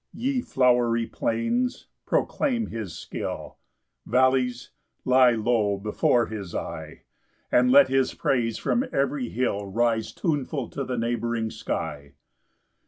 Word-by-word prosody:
6 - - -16
Ye 260 +1 0
flowery 120 - +2
plains, 235 - -1 0.2
proclaim 245 -6 0
his 110 -7 -5
skill; - - -6 0.5
Vallies, 130 +1 +2 0.3
lie 130 -1 +5
low 110 -3 +1
before 110 +3 +1
his 100 -6 -7
eye; - - -6 0.5
And 125 0 +4
let 140 +1 +8
his 135 0 +1
praise 115 -4 0
from 240 - 0
every 135 -3 0
hill 105 -4 -1
Rise 115 +2 0
tuneful 145 -5 -2
to 140 - -4
the 125 -1 -3
neighbouring 115 -1 -1
sky. 70 -3 -5
120 Hz, 120 wpm, -25 LUFS, 115-135 Hz, 0.5 s, let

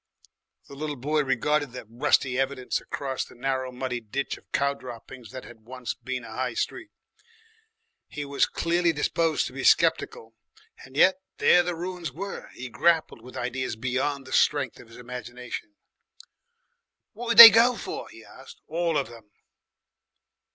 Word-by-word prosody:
The - - -12
little 150 +1 -4
boy 150 +4 0
regarded 140 +1 0
the 125 - -8
rusty 125 +2 +1
evidences 135 -1 -2
acrosss 135 -2 -4
the - - -15
narrow 130 +1 -2
muddy 125 -1 -4
ditch 120 +5 -4
of - - -20
cow 140 0 +1
droppings 125 -2 -11
that 130 0 -9
had 120 -2 -13
once 125 -1 -5
been 130 -2 -6
a 115 - -10
High 125 -1 -3
Street. 320 - -3 1.2
He 145 0 -6
was 140 0 +1
clearly 170 0 0
disposed 160 +1 0
to - - -7
be - - -6
sceptical, 115 0 +2 0.5
and 130 +1 -12
yet 185 +3 +5 0.2
there 180 - +5
the 175 0 -3
ruins 175 -2 -5
were! 195 +8 -7
He 130 - -7
grappled 160 0 +1
with 125 +2 -11
ideas 125 -1 -3
beyond 130 +4 -2
the 130 - -9
strength 140 -4 +1
of - - -14
his 115 - -15
imagination. 125 - -8 1.4
"What 235 +2 -7
did 230 - +1
they 230 -1 +15
go 230 +3 +4
for?" - - -6
he - - -14
asked, - - -14
"all 165 -1 -1
of 140 - -1
'em?" 115 -3 -15
135 Hz, 160 wpm, -26 LUFS, 125-160 Hz, 1.4 s, they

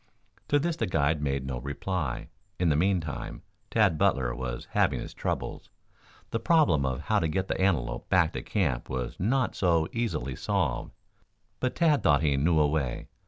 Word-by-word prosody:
To 145 - +3
this 165 +3 0
the - - 0
guide 75 -2 +1
made 70 -2 -1
no 65 -2 -3
reply. 70 +1 -3 0.3
In 90 -2 +2
the 75 - +3
meantime, 85 -3 -1 0.3
Tad 100 -9 +3
Butler 60 -3 +2
was 60 -1 -5
having - - +2
his - - -7
troubles. - - -4 0.6
The 115 - 0
problem 140 - +3
of 65 -1 -2
how - - +1
to 80 - +1
get 95 +5 -1
the - - -2
antelope 85 -11 0
back 90 -3 +3
to - - -3
camp 80 - -1
was 65 -1 -4
not 120 +6 +1
so 85 -4 +2
easily 80 - -2
solved. - - -1 0.7
But 125 - -1
Tad 155 -4 +3
thought 70 +1 +3
he 70 -3 +3
knew 80 +4 +3
a 75 - +5
way. 70 -5 -2
80 Hz, 175 wpm, -28 LUFS, 70-95 Hz, 0.7 s, a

